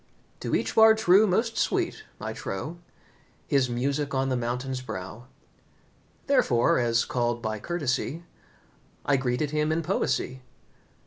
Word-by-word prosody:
To - - -1
each - - -1
Bard 220 0 +7
true 210 0 +5
most 225 +5 0
sweet - - -1
I - - -4
trow 150 - -5 0.7
His 135 -3 +2
music 140 +4 -1
on 135 0 +1
the 130 - 0
mountain's 125 +2 -3
brow. 110 +1 -7 1.0
Therefore, 120 +1 +3
as 115 -1 +2
called 120 -1 -1
by 110 -2 -3
courtesy, 160 +2 -2 0.8
I 140 - +3
greeted 130 +3 -1
him 150 0 +1
in 165 +1 0
poesy. 140 -7 -1
135 Hz, 130 wpm, -27 LUFS, 120-165 Hz, 1.0 s, Bard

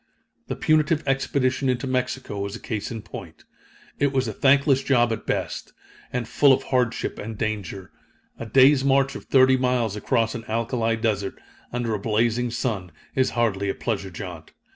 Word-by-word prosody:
The - - -3
punitive 155 0 +2
expedition 135 -1 +1
into 125 +1 0
Mexico 125 -4 -2
was 100 0 -3
a - - -7
case 105 -3 -4
in 115 -3 -6
point. - - -10 0.6
It 140 -1 +2
was 130 -2 0
a 110 - -3
thankless 135 +2 +4
job 120 -4 +2
at 110 - -7
best, - - -3 0.4
and 125 -2 -2
full 140 +3 +4
of - - 0
hardship 125 -3 -1
and 110 0 -6
danger. 100 -4 -4 0.5
A 115 - -5
day's 135 +3 +5
march 135 0 +3
of - - -8
thirty 130 -1 +5
miles 125 -5 0
across 115 +1 0
an 115 - -6
alkali 115 0 0
desert, 105 -4 -2 0.3
under 120 -2 -2
a 105 - -1
blazing 115 +3 +1
sun, 110 -7 -3 0.2
is 130 -1 +2
hardly 100 -4 +1
a - - -1
pleasure 100 -5 -3
jaunt. 85 -3 -8
120 Hz, 170 wpm, -24 LUFS, 110-130 Hz, 0.6 s, day's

